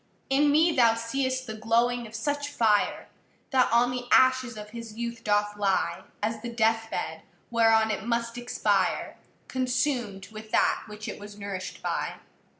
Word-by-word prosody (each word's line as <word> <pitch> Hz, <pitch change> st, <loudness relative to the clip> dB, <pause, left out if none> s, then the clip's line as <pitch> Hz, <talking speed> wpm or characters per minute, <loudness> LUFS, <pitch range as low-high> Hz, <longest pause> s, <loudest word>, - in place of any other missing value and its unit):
In 290 Hz, +2 st, +4 dB
me 320 Hz, +3 st, +4 dB
thou 235 Hz, -3 st, +5 dB
seeâst 260 Hz, +3 st, -2 dB
the 220 Hz, -, -5 dB
glowing 235 Hz, +2 st, +1 dB
of 220 Hz, -, -11 dB
such 285 Hz, +5 st, -2 dB
fire, 220 Hz, -7 st, +1 dB, 0.4 s
That 255 Hz, -5 st, +3 dB
on 240 Hz, +1 st, +4 dB
the 250 Hz, -1 st, -4 dB
ashes 255 Hz, -3 st, +4 dB
of 210 Hz, 0 st, -9 dB
his 230 Hz, -2 st, -8 dB
youth 235 Hz, 0 st, -4 dB
doth 205 Hz, 0 st, +1 dB
lie, 195 Hz, -4 st, 0 dB, 0.2 s
As 220 Hz, 0 st, -1 dB
the 240 Hz, -, -5 dB
death 225 Hz, -1 st, +1 dB
bed, -, -, -4 dB, 0.3 s
whereon 225 Hz, -1 st, +4 dB
it 210 Hz, -, -3 dB
must 235 Hz, 0 st, -1 dB
expire, 245 Hz, 0 st, 0 dB, 0.3 s
Consumâd 250 Hz, -6 st, -1 dB
with 215 Hz, 0 st, -10 dB
that -, -, +2 dB
which 210 Hz, 0 st, -8 dB
it -, -, -6 dB
was 205 Hz, 0 st, -10 dB
nourishâd 200 Hz, -2 st, -6 dB
by. -, -, -2 dB
230 Hz, 160 wpm, -27 LUFS, 215-250 Hz, 0.4 s, thou